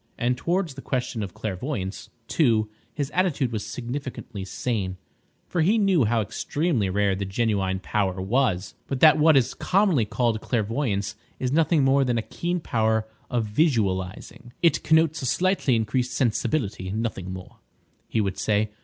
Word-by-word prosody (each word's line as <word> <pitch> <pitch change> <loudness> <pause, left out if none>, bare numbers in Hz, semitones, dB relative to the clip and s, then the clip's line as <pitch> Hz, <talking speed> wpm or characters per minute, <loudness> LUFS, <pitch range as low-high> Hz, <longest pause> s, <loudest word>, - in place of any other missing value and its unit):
And 125 +1 +1
towards 170 +4 -1
the 135 - -9
question 125 -4 -2
of 100 -3 -5
clairvoyance, 100 -1 -4 0.2
too, 110 -8 +2 0.2
his 145 -1 -3
attitude 160 -9 +1
was 110 -2 -3
significantly 125 -5 -6
sane, 95 -1 -3 0.5
for 175 - 0
he 200 +8 +4
knew 195 - +3
how 115 +1 +2
extremely 120 - -1
rare 100 +1 +2
the 100 - -3
genuine 95 -2 0
power 95 -1 -1
was, 100 -1 0 0.2
and 135 - -2
that 155 -1 +7
what 155 -1 +6
is 125 - +2
commonly 185 - +2
called 115 0 0
clairvoyance 110 -3 -1 0.2
is 130 -1 -2
nothing 160 0 +3
more 135 +1 +4
than 125 -2 0
a 115 - -1
keen 175 +8 -2
power 110 -6 0 0.2
of 120 -3 0
visualising. 105 - -1
"It 165 -3 +4
connotes 160 0 +3
a 130 - -2
slightly 175 -1 +2
increased 120 +3 0
sensibility, 115 -6 0
nothing 100 -3 -3
more," 95 -1 -9 0.5
he 110 - 0
would 100 -2 -2
say. 105 0 +1
120 Hz, 155 wpm, -25 LUFS, 105-145 Hz, 0.5 s, that